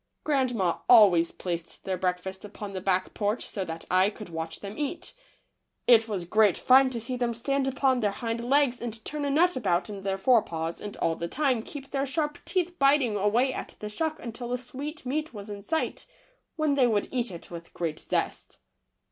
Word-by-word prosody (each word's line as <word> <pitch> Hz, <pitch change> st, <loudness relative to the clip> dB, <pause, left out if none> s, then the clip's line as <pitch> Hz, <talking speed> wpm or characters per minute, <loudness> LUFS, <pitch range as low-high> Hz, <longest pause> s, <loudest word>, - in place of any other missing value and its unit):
Grandma 250 Hz, -, +1 dB
always 195 Hz, -8 st, +7 dB
placed 170 Hz, -2 st, -5 dB
their 190 Hz, -, -1 dB
breakfast 185 Hz, +1 st, -2 dB
upon 205 Hz, -1 st, -8 dB
the 185 Hz, -, -4 dB
back 185 Hz, 0 st, +1 dB
porch 210 Hz, +2 st, -1 dB
so 200 Hz, -, -3 dB
that 165 Hz, -2 st, -6 dB
I 185 Hz, +2 st, +5 dB
could 210 Hz, -2 st, -10 dB
watch 165 Hz, 0 st, -5 dB
them 200 Hz, +1 st, -7 dB
eat. 295 Hz, +3 st, -4 dB, 0.7 s
It 230 Hz, -2 st, +6 dB
was 195 Hz, -5 st, -3 dB
great 210 Hz, +1 st, +4 dB
fun 260 Hz, +1 st, +6 dB
to 245 Hz, -2 st, -4 dB
see 245 Hz, +3 st, -4 dB
them 240 Hz, -2 st, -1 dB
stand 275 Hz, +3 st, 0 dB
upon 270 Hz, -1 st, +2 dB
their 210 Hz, -3 st, +2 dB
hind 230 Hz, +2 st, -3 dB
legs 265 Hz, 0 st, +2 dB
and 230 Hz, -2 st, -6 dB
turn 295 Hz, -1 st, -3 dB
a -, -, 0 dB
nut 345 Hz, +6 st, +3 dB
about 195 Hz, -5 st, 0 dB
in 200 Hz, -1 st, -7 dB
their 195 Hz, 0 st, -1 dB
forepaws 170 Hz, -7 st, +1 dB
and 205 Hz, -, -7 dB
all 165 Hz, -, +1 dB
the 170 Hz, -, -4 dB
time 260 Hz, -, +1 dB
keep 275 Hz, +3 st, -9 dB
their 275 Hz, 0 st, -1 dB
sharp 295 Hz, +2 st, -2 dB
teeth 355 Hz, -1 st, -1 dB
biting 275 Hz, -5 st, +4 dB
away 225 Hz, +6 st, +2 dB
at -, -, -6 dB
the 210 Hz, -, -6 dB
shuck 315 Hz, +8 st, -2 dB
until 235 Hz, +1 st, -6 dB
the 250 Hz, -, 0 dB
sweet 265 Hz, +4 st, -7 dB
meat 300 Hz, +1 st, -2 dB
was 205 Hz, 0 st, -7 dB
in 200 Hz, -1 st, -7 dB
sight, 320 Hz, +10 st, -2 dB, 0.5 s
when 310 Hz, -3 st, +1 dB
they 265 Hz, -3 st, +4 dB
would 210 Hz, -3 st, +1 dB
eat 245 Hz, -2 st, 0 dB
it 175 Hz, -2 st, -10 dB
with 170 Hz, -1 st, -9 dB
great 165 Hz, -3 st, -2 dB
zest. -, -, -2 dB
230 Hz, 200 wpm, -27 LUFS, 195-270 Hz, 0.7 s, always